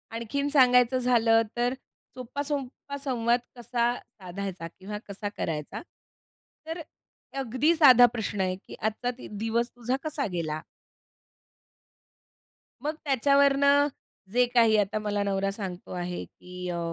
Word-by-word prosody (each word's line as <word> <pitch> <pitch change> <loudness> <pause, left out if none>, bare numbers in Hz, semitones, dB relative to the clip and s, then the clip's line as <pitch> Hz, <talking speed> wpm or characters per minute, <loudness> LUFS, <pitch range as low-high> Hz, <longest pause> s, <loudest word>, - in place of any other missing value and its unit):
आणखीन 255 +5 -2
सांगायचं 250 -3 +5
झालं 235 -2 +4 0.2
तर, 245 +1 +1 0.4
सोपा, 255 +2 -5
सोपा 280 -1 -4
संवाद 245 -4 +1 0.2
कसा 240 0 0
साधायचा 185 -2 -7
किंवा 190 +5 -8
कसा 205 +1 -5
करायचा? 150 -2 -3 0.9
तर 325 +1 -4 0.6
अगदी 270 +6 +2
साधा 255 -6 +8
प्रश्न 205 -3 -2
आहे, 185 -1 0
की - - -9
आजचा 220 +3 -1
दि - - -9
दिवस 225 +3 -1
तुझा 245 +1 -1
कसा 305 -2 -2
गेला? 155 -3 -3 2.2
मग 305 +2 -1
त्याच्यावरनं 280 +1 +4 0.4
जे 245 +1 +4
काही 230 -3 +5
आता 210 +1 +1
मला 205 -1 -1
नवरा 195 0 0
सांगतो 190 -3 -7
आहे, 180 0 -4
की 180 0 -9
अ, 175 - -2
235 Hz, 125 wpm, -27 LUFS, 200-265 Hz, 2.2 s, साधा